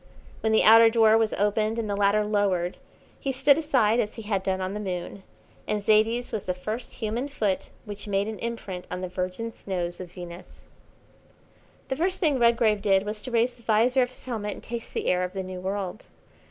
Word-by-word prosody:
When 220 Hz, -, 0 dB
the 220 Hz, -, +4 dB
outer 225 Hz, +1 st, +8 dB
door 225 Hz, -1 st, +5 dB
was 225 Hz, -1 st, +2 dB
opened 215 Hz, +2 st, +1 dB
and 225 Hz, -2 st, -2 dB
the 205 Hz, -, -1 dB
ladder 205 Hz, +1 st, +3 dB
lowered 195 Hz, -4 st, 0 dB, 0.4 s
he 275 Hz, -, -2 dB
stood 275 Hz, +3 st, +4 dB
aside, 245 Hz, -8 st, +2 dB
as 215 Hz, -3 st, -1 dB
he 225 Hz, -, -7 dB
had 205 Hz, -2 st, -1 dB
done 190 Hz, 0 st, -1 dB
on 185 Hz, +1 st, -3 dB
the 210 Hz, -, -4 dB
Moon, 190 Hz, -1 st, -5 dB, 0.5 s
and 210 Hz, -1 st, -2 dB
Zaidie's 225 Hz, +3 st, +3 dB
was 215 Hz, -, -3 dB
the 180 Hz, -, -1 dB
first 215 Hz, +6 st, -5 dB
human 230 Hz, +4 st, -3 dB
foot 215 Hz, -9 st, -2 dB, 0.2 s
which 205 Hz, 0 st, -7 dB
made 200 Hz, 0 st, 0 dB
an 220 Hz, -1 st, -5 dB
imprint 215 Hz, -6 st, -5 dB
on 180 Hz, -, -4 dB
the 185 Hz, -, -3 dB
virgin 185 Hz, +5 st, -4 dB
snows 175 Hz, -3 st, -4 dB
of 180 Hz, -2 st, -8 dB
Venus. 175 Hz, -1 st, -10 dB, 1.3 s
The 265 Hz, -, 0 dB
first 365 Hz, +6 st, -1 dB
thing 295 Hz, -6 st, +2 dB
Redgrave 230 Hz, -3 st, +3 dB
did 195 Hz, -1 st, +3 dB
was 210 Hz, 0 st, -3 dB
to 255 Hz, -, -7 dB
raise 235 Hz, +1 st, +2 dB
the 240 Hz, -, -20 dB
visor 235 Hz, +4 st, +3 dB
of 245 Hz, -, +1 dB
his 255 Hz, -, -11 dB
helmet 215 Hz, -5 st, -3 dB
and -, -, -12 dB
taste 235 Hz, 0 st, -6 dB
the -, -, -2 dB
air 180 Hz, 0 st, +2 dB
of 180 Hz, -, -4 dB
the 190 Hz, -1 st, -3 dB
new 185 Hz, 0 st, -7 dB
world. 195 Hz, +1 st, -4 dB
215 Hz, 210 wpm, -26 LUFS, 190-230 Hz, 1.3 s, outer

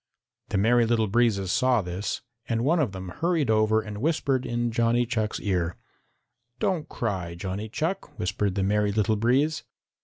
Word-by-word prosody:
The -, -, 0 dB
Merry 115 Hz, +3 st, +4 dB
Little 115 Hz, -1 st, +2 dB
Breezes 105 Hz, -3 st, +1 dB
saw 125 Hz, -2 st, +3 dB
this, 90 Hz, +3 st, -3 dB, 0.3 s
and 115 Hz, 0 st, 0 dB
one 165 Hz, +6 st, +3 dB
of 135 Hz, -10 st, +1 dB
them 95 Hz, -1 st, -7 dB
hurried 160 Hz, -, 0 dB
over 110 Hz, 0 st, +3 dB
and 105 Hz, -1 st, -7 dB
whispered 140 Hz, -4 st, 0 dB
in 120 Hz, 0 st, -1 dB
Johnny 115 Hz, +1 st, +2 dB
Chuck's 110 Hz, -2 st, -1 dB
ear. 90 Hz, -4 st, -1 dB, 0.8 s
"Don't 160 Hz, -1 st, -1 dB
cry, 95 Hz, -7 st, -3 dB
Johnny 95 Hz, +4 st, -4 dB
Chuck," 160 Hz, -, -3 dB
whispered 95 Hz, +1 st, -1 dB
the 100 Hz, -, 0 dB
Merry 105 Hz, +1 st, +2 dB
Little 110 Hz, +1 st, +1 dB
Breeze. 130 Hz, +8 st, +1 dB
110 Hz, 160 wpm, -26 LUFS, 100-120 Hz, 0.8 s, Merry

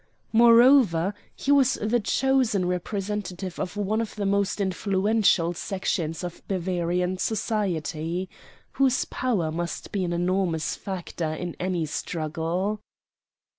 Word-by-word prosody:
Moreover, 230 Hz, -6 st, +6 dB, 0.2 s
he 280 Hz, -, -1 dB
was 275 Hz, -2 st, +5 dB
the 220 Hz, +3 st, 0 dB
chosen 245 Hz, -4 st, +1 dB
representative 185 Hz, 0 st, -3 dB
of 180 Hz, +3 st, -4 dB
one 210 Hz, +2 st, 0 dB
of 225 Hz, -, -5 dB
the 205 Hz, -2 st, -2 dB
most 200 Hz, +1 st, +1 dB
influential 195 Hz, -2 st, +2 dB
sections 175 Hz, -3 st, -2 dB
of 175 Hz, -1 st, -6 dB
Bavarian 180 Hz, -1 st, -1 dB
society, 180 Hz, -5 st, -1 dB, 0.4 s
whose 265 Hz, -2 st, +2 dB
power 200 Hz, -11 st, -1 dB
must 170 Hz, +1 st, -4 dB
be 200 Hz, -3 st, -1 dB
an 175 Hz, -, -2 dB
enormous 175 Hz, -2 st, 0 dB
factor 175 Hz, -4 st, -4 dB
in 175 Hz, +1 st, -5 dB
any 180 Hz, -3 st, -1 dB
struggle. 165 Hz, +6 st, -2 dB
190 Hz, 115 wpm, -26 LUFS, 175-210 Hz, 0.4 s, Moreover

